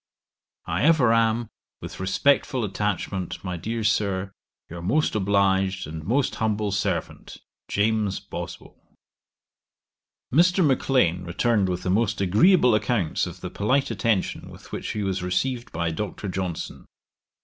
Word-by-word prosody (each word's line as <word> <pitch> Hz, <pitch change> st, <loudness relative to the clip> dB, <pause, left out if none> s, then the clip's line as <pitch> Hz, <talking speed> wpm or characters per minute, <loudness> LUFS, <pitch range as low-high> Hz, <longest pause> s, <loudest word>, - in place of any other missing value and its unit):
'I -, -, -1 dB
ever 145 Hz, -8 st, +5 dB
am 115 Hz, 0 st, +2 dB, 0.3 s
with -, -, -9 dB
respectful 125 Hz, +6 st, +1 dB
attachment, 95 Hz, -2 st, -3 dB
my 90 Hz, -2 st, -3 dB
dear 110 Hz, +7 st, -3 dB
Sir, 100 Hz, -3 st, 0 dB, 0.4 s
'Your 85 Hz, +1 st, -8 dB
most 145 Hz, -, +1 dB
obliged 95 Hz, -2 st, +1 dB
'And 80 Hz, +1 st, -7 dB
most 125 Hz, -, +1 dB
humble 105 Hz, -2 st, 0 dB
servant, 100 Hz, -, -3 dB, 0.3 s
'JAMES 105 Hz, -1 st, 0 dB
BOSWELL.' -, -, -9 dB, 1.4 s
Mr. 180 Hz, +4 st, +4 dB
Maclean 125 Hz, -, +2 dB
returned 100 Hz, +3 st, +1 dB
with 90 Hz, 0 st, -3 dB
the 90 Hz, -, 0 dB
most 105 Hz, +1 st, +1 dB
agreeable 120 Hz, -, +4 dB
accounts 105 Hz, -4 st, 0 dB
of -, -, -9 dB
the -, -, -6 dB
polite 130 Hz, +6 st, +1 dB
attention 110 Hz, -2 st, -1 dB
with -, -, -14 dB
which -, -, -4 dB
he 105 Hz, -, -2 dB
was 95 Hz, -1 st, -1 dB
received 115 Hz, +8 st, -1 dB
by 85 Hz, 0 st, -1 dB
Dr. 100 Hz, +3 st, -4 dB
Johnson. 90 Hz, -2 st, -4 dB
105 Hz, 130 wpm, -25 LUFS, 95-115 Hz, 1.4 s, ever